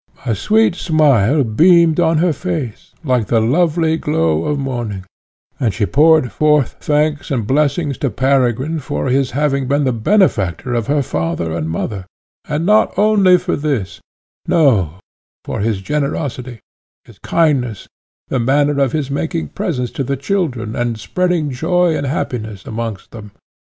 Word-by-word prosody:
A 115 - 0
sweet 215 - +2
smile 150 - +2
beamed 165 +7 +4
on 165 -2 +3
her 170 +1 +2
face, 115 - -5
like 125 -6 0
the 115 - +2
lovely 160 +6 +1
glow 80 - 0
of 150 - -1
morning, 120 -8 -4 0.5
and 115 -8 0
she 105 - 0
poured 150 - +3
forth 150 -4 +1
thanks 150 0 0
and 120 -6 -1
blessings 145 - 0
to 140 - 0
Peregrine 130 +5 0
for 145 -1 -3
his 135 +1 +1
having 140 -3 0
been 140 +2 +1
the 130 -2 +1
benefactor 120 - +1
of 115 -3 -1
her 145 0 +1
father 80 -5 -3
and 80 -1 -3
mother, 95 +3 -4 0.4
and 150 +3 -2
not 210 0 +3
only 200 -3 +4
for - - -2
this, 130 -11 -3 0.5
no 105 - +2 0.5
for - - -4
his 105 -1 -1
generosity, 130 - -3 0.4
his - - -18
kindness, 135 - 0 0.4
the 130 - -1
manner 140 +3 +1
of 135 -3 +1
his 145 -3 -2
making 160 +3 -3
presents 125 -8 -3
to 135 - -3
the 140 +2 -2
children, 135 - -2
and 120 -2 -2
spreading 175 +3 -1
joy 170 +5 +1
and 140 - -2
happiness 110 - -4
amongst 110 -3 -5
them. 105 -3 -11
135 Hz, 150 wpm, -17 LUFS, 115-155 Hz, 0.5 s, beamed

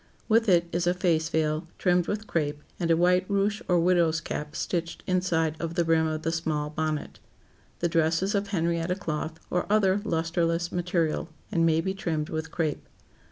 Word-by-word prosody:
With 225 -1 +3
it 170 -2 +4
is 175 +1 0
a 175 - +3
face 165 -4 +1
veil, 155 0 0
trimmed 180 -2 +2
with 215 +1 -2
crape, 150 -5 -2 0.2
and 170 - -1
a 165 - +4
white 180 +1 +4
ruche 200 +1 +1
or 180 -1 +3
"widow's 170 -2 +3
cap" 150 0 -5
stitched 170 -2 -3
inside 170 -4 +1
of 165 0 -4
the 170 - +2
brim 160 0 +3
of 155 0 -3
the 165 - 0
small 155 -3 -2
bonnet. 155 -1 -3 0.6
The 170 - +3
dress 165 0 +2
is 195 +3 0
of 200 0 0
Henrietta 170 -2 0
cloth, 160 -3 -4
or 180 - 0
other 205 -2 +3
lusterless 165 0 0
material, 175 -3 -1 0.2
and 165 -4 +3
may 160 0 +3
be 190 +2 -2
trimmed 165 -6 -2
with 160 0 -3
crape. 155 -3 -2
170 Hz, 185 wpm, -27 LUFS, 160-180 Hz, 0.6 s, it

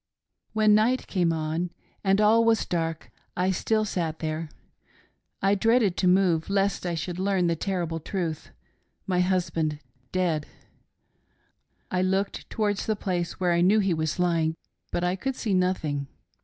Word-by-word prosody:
" - - -51
When 215 -1 +4
night 230 +5 +3
came 175 -4 +1
on 160 +2 -2 0.3
and 195 0 +3
all 220 +2 +5
was 230 -1 +3
dark 165 -2 -3 0.3
I 185 +1 +2
still 215 +4 +1
sat 165 -6 -2
there; 155 0 -3 0.9
I 195 +1 +4
dreaded 220 -1 +3
to 185 - +2
move 180 -3 +3
lest 195 -2 0
I 170 - -1
should 175 +3 -4
learn 190 -2 +1
the 170 -1 +2
terrible 170 -2 -2
truth 165 -2 -4 0.3
— - - -46
my 180 -2 0
husband 170 -4 0 0.3
dead! 170 -5 0 1.4
I 185 - +1
looked 190 +2 -1
towards 205 -2 -1
the 220 - +1
place 180 -4 -3
where 180 -1 +2
I 170 0 +3
knew 195 +5 +5
he 195 -4 +2
was 155 -1 -1
lying, 165 -3 +1 0.4
but 175 - -1
I 180 +1 +1
could 265 +7 -3
see 215 -6 -2
nothing. 160 -7 0
180 Hz, 160 wpm, -26 LUFS, 165-200 Hz, 1.4 s, all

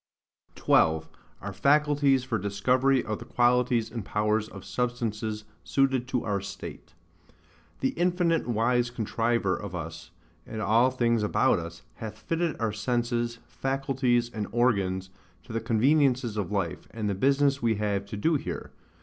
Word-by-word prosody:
12. 80 0 +3 0.3
Our - - -5
Faculties 145 -2 +3
for 115 -4 -1
Discovery 125 +7 +2
of 110 -1 -3
the - - -9
Qualities 120 -2 +2
and 115 -2 -4
powers 105 +2 0
of 100 -3 -10
Substances 110 -3 -2 0.2
suited 135 -2 +1
to 130 -3 -1
our 100 -2 -1
State. 100 0 -9 0.9
The 130 - +2
infinite 175 -3 +1
wise 120 +1 +2
Contriver 115 -3 0
of 100 -3 -6
us, 85 -1 -7 0.4
and 110 - -6
all 115 +4 +4
things 120 -3 +1
about 105 - +2
us, 85 0 -8
hath 110 -1 -7
fitted 165 +8 -2
our 115 -2 0
senses, 120 +1 -1
faculties, 135 -3 0
and 105 -2 -3
organs, 95 -6 +1 0.3
to 80 - -10
the 115 - -1
conveniences 125 +1 +2
of 105 -4 -2
life, 95 -4 -2
and 110 -2 -4
the 100 - 0
business 140 +6 +2
we 115 -2 +2
have 100 -1 -1
to 105 - -6
do 160 +9 +2
here. - - -6
115 Hz, 150 wpm, -27 LUFS, 105-130 Hz, 0.9 s, all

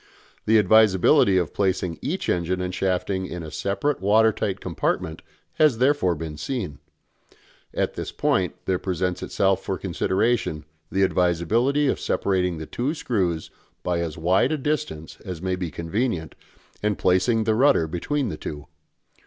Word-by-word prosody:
The 110 +1 +6
advisability 100 -2 +5
of 90 -4 0
placing 95 -3 -1
each 170 +8 -3
engine 90 +1 0
and 90 0 -3
shafting 95 0 -1
in 90 -2 -6
a 80 - -8
separate 100 - -1
water 110 +3 +4
tight 100 -2 -3
compartment 80 -3 -2 0.4
has 150 -7 +5
therefore 130 -9 +2
been 80 -1 -6
seen. 90 - -4 0.9
At - - -1
this - - -5
point 90 -2 0
there 95 -1 0
presents 90 -1 -2
itself 95 -1 +1
for - - -2
consideration 95 -6 0 0.3
the 95 - +2
advisability 95 - +2
of - - 0
separating 90 -3 0
the 80 - -6
two 130 - -2
screws 90 - -1 0.3
by 90 -1 0
as 85 -2 -3
wide 90 - +2
a 155 - +1
distance 145 - -3
as 90 -5 -6
may 95 +1 -1
be 90 -2 -4
convenient 85 - -2 0.5
and 105 -1 0
placing 100 +5 +2
the 110 0 +2
rudder 125 - +4
between 115 - -2
the - - -5
two. 75 -1 -7
95 Hz, 155 wpm, -24 LUFS, 85-110 Hz, 0.9 s, The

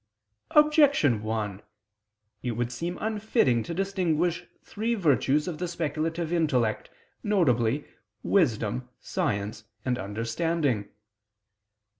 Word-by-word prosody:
Objection 290 - +5
1: 110 -2 -3 0.8
It 125 - -2
would 120 +1 -2
seem 170 +8 -4
unfitting 215 - +1
to 140 - -6
distinguish 180 -2 0 0.2
three 230 +3 -2
virtues 150 - +2
of 165 -4 -4
the 180 - -2
speculative 165 0 -2
intellect, 130 -10 +1 0.3
viz. 145 - +2 0.4
wisdom, 125 - +1
science 105 +1 -2 0.2
and 125 -1 0
understanding. 115 - -1
150 Hz, 95 wpm, -27 LUFS, 115-175 Hz, 0.8 s, Objection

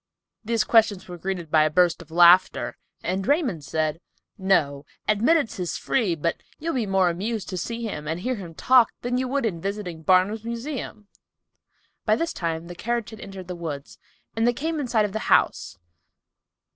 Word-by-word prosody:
These 230 0 +1
questions 220 -4 +3
were 175 -1 -8
greeted 180 -3 -4
by 155 - +5
a 155 - +2
burst 175 +2 +3
of 170 - -14
laughter, 175 +2 +5 0.3
and 190 +3 -2
Raymond 265 - +1
said, 155 +3 -2 0.3
"No—admittance 195 - +1
is 180 -2 -2
free, 215 -10 0
but 170 +2 -2 0.2
you'll 330 +2 -3
be 235 -5 -1
more 190 -2 +3
amused 210 +5 -3
to 185 - -4
see 235 +5 -4
him 150 -9 -5
and 165 +3 -3
hear 255 +5 -1
him 180 -8 -8
talk 250 +2 +5
than 245 +1 0
you 260 - -1
would 275 0 0
in 175 -7 -2
visiting 195 -4 -4
Barnum's 185 +6 +3
Museum!" 235 -2 -5 1.0
By 215 - +3
this 335 +7 -2
time 165 -1 -3
the 175 - -8
carriage 235 +5 -3
had 220 - -10
entered 190 -3 -9
the 180 - -5
woods, 155 -5 -7 0.4
and 225 +1 +2
they 240 - +3
came 315 +5 -2
in 280 - -2
sight 220 -3 +2
of 200 - -5
the 220 - -3
house. 95 - +2
195 Hz, 185 wpm, -24 LUFS, 170-235 Hz, 1.0 s, by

